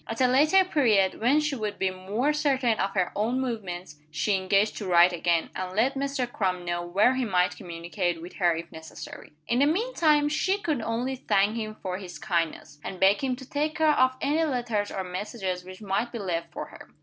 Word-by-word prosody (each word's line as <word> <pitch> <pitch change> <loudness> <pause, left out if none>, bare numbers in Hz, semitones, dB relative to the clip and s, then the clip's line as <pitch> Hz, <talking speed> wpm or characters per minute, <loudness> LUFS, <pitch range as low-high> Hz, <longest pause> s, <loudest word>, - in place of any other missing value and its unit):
At 225 - -5
a 260 - +5
later 305 +9 +5
period, 220 - +2
when 260 +6 +4
she 300 -2 -1
would 215 -4 -4
be 190 -1 0
more 205 +10 -1
certain 270 -6 +1
of 195 +1 -1
her 185 -2 +1
own 230 +5 0
movements, 190 - -4
she 155 +7 0
engaged 195 +3 +2
to 200 - -5
write 175 0 +6
again, 170 -1 0
and 185 0 -4
let 245 +6 +2
Mr. 275 -1 -1
Crum 185 -7 -2
know 175 0 -1
where 195 +8 +3
he 260 0 -1
might 180 -5 +1
communicate 175 -1 -3
with 175 +2 -9
her 175 -3 +3
if 165 +1 -7
necessary. 160 0 -10 0.2
In 240 - +1
the 285 - +5
mean 440 +11 0
time, 300 -5 +3
she 375 +6 +1
could 305 - -1
only 240 +4 -2
thank 205 -4 +1
him 215 -2 -4
for 185 -1 -3
his 185 -3 -8
kindness, 165 -5 -2
and 185 - -6
beg 195 +6 +4
him 260 -2 0
to 260 0 -12
take 300 +2 -1
care 315 -2 +4
of 255 -1 +3
any 300 +4 +1
letters 240 -8 -1
or 190 - -4
messages 185 0 -4
which 185 +3 -11
might 205 +4 -1
be 235 - -5
left 170 -5 -3
for - - -5
her. - - -13
215 Hz, 215 wpm, -27 LUFS, 185-260 Hz, 0.2 s, write